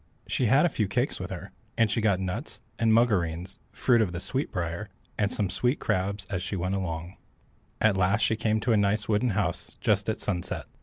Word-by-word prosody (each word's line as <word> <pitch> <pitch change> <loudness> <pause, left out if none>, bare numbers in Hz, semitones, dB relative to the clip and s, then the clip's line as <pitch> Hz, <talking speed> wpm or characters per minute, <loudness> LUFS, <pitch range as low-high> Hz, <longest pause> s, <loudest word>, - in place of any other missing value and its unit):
She 125 - 0
had 135 +9 +5
a - - +3
few 110 -9 0
cakes 100 - -1
with - - -5
her, - - -7 0.3
and 115 -2 +3
she 115 - +1
got 100 -4 +3
nuts, 95 -1 -4 0.2
and 115 -1 +3
mugoreens 95 -6 +1
(fruit 120 -2 +3
of 95 -5 0
the 85 - -3
sweet 135 +9 -3
briar), 85 +4 -3 0.3
and 100 -1 0
some 105 - 0
sweet 125 +8 0
crabs, 95 +2 -1
as 95 -2 -3
she 95 +2 -3
went 90 +1 -1
along. 85 -2 -3 0.6
At 105 -3 +3
last 95 +4 +2
she 110 - +3
came 110 0 +1
to 115 +1 +2
a - - +4
nice 105 +1 +1
wooden 110 +3 +2
house 105 - -2
just - - +1
at - - -1
sunset. 90 -1 -3
100 Hz, 210 wpm, -28 LUFS, 90-110 Hz, 0.6 s, had